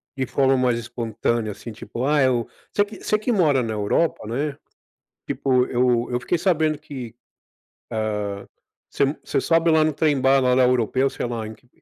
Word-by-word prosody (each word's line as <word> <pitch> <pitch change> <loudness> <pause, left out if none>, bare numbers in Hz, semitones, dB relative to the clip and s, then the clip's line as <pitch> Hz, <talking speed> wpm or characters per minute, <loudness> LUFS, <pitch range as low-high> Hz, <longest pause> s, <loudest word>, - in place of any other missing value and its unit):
de 130 -2 -2
forma 135 +1 +2
mais 125 -2 +2
espontânea? 115 -1 -2
Assim, 115 +3 -9
tipo: 120 +3 -5
"Ah, 145 0 +3
eu", 125 -3 +2 0.2
você 205 - +2
que 210 - -12
você 215 - +2
que 215 +4 -2
mora 150 - +3
na 110 -1 -3
Europa, 105 +6 0
né. 140 +5 -2 0.7
Tipo 125 -2 +1
eu 120 -1 +1
eu 120 - 0
fiquei 175 +7 -1
sabendo 160 -4 +1
que, 130 -6 -8 0.8
hã, 105 -2 -3 0.4
você - - 0
m 140 +2 0
você 135 - -1
sobe 165 +2 +2
lá 160 -1 +5
no 155 - +2
trem 150 -2 +1
bala 135 -1 +4
lá 130 - +4
europeu, 125 +2 +2
sei - - -4
lá, 115 -2 -4
em 110 - -7
q 125 - -23
130 Hz, 190 wpm, -23 LUFS, 115-150 Hz, 0.8 s, lá